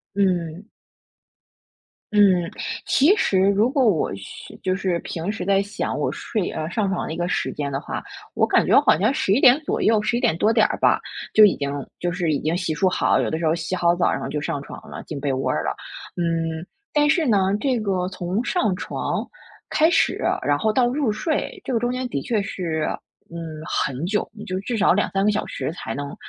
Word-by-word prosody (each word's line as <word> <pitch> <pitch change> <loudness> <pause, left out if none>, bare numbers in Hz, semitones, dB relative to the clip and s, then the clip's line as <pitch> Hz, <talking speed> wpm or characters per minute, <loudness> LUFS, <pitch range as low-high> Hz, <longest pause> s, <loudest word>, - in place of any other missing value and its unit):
嗯。 180 -2 0 1.5
嗯， 205 - +6 0.6
其 320 +10 +4
实 190 - +2
如 200 +4 +4
果 275 -3 +2
我 195 - +2
是 100 - -10
就 185 0 0
是 185 -3 -1
平 170 +4 -4
时 220 - -5
在 195 +1 +3
想 200 +2 -3
我 - - 0
睡， 210 -6 -3
呃， 155 +1 -4
上 210 0 0
床 185 - -2
的 - - -5
一 - - -6
个 175 0 -1
时 - - -1
间 145 -1 -4
的 135 - -2
话， - - -5 0.3
我 - - +3
感 - - +3
觉 - - +3
我 - - +7
好 - - +5
像 220 +6 +3
11 275 -5 +1
点 260 +3 +7
左 300 - -2
右， 220 -1 +4
11 225 +3 0
点 165 -8 +1
多 220 +4 +3
点 220 -2 +4
儿 - - -3
吧， - - +3 0.3
就 215 - +8
已 205 - +6
经 140 -1 -2 0.3
就 175 0 -1
是 175 -3 -1
已 145 - 0
经 160 +3 -1
洗 175 -2 -2
漱 185 +5 +2
好， 185 - +2
有 - - -1
的 160 - -1
时 165 - 0
候 155 - +3
洗 170 +2 -3
好 175 -1 +2
澡 175 - +2
然 - - -2
后 - - -4
就 150 - -2
上 145 -1 -3
床 - - -9
了， - - -8
进 150 - -5
被 140 -1 -1
窝 130 - -1
儿 75 - 0
了。 70 - -1 0.4
嗯， 165 -1 -1 0.3
但 295 -1 +3
是 325 0 +3
呢， 215 -7 +3 0.2
这 260 -4 0
个 190 -4 -1
从 185 +5 -3
上 345 - +1
床 - - -3 0.4
开 315 +2 +4
始， - - +2 0.3
然 145 - +2
后 215 - +2
到 250 +1 +3
入 260 -3 0
睡， 290 +9 -2
这 260 - -3
个 230 - +2
中 240 +1 0
间 255 0 -2
的 140 - -2
确 220 - 0
是， 165 -5 -3 0.5
嗯， 170 - -6 0.3
很 135 +5 -1
久， 210 +3 -1
你 210 - -8
就 185 0 -3
至 230 +3 -3
少 185 - +4
2-3 195 0 0
个 210 - +4
小 210 - -1
时 130 +3 -4
才 115 -10 -6
能， 140 0 -5
190 Hz, 235 characters per minute, -23 LUFS, 165-220 Hz, 1.5 s, 就